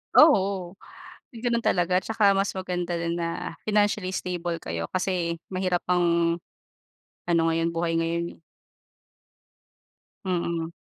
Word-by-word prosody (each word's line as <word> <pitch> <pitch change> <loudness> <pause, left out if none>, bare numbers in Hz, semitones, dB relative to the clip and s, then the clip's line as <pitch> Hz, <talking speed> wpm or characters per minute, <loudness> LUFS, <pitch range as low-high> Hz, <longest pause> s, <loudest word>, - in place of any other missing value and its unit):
Oo, 195 - +5 0.6
gano'n 235 0 0
talaga 180 +1 +3
tsaka 215 -1 +3
mas 195 0 0
maganda 180 -2 -2
din 170 0 -2
na 170 0 -4
financially 205 -3 +2
stable 175 -1 -2
kayo, 85 0 -3
kasi 180 -2 -1 0.2
mahirap 185 -2 0
ang 170 -1 +3 0.9
ano 170 -1 +3
ngayon, 165 +1 +1
buhay 165 0 0
ngayon 170 +1 -1
eh. - - -35 1.9
Mm. 170 -3 -1
175 Hz, 110 wpm, -26 LUFS, 170-190 Hz, 1.9 s, Oo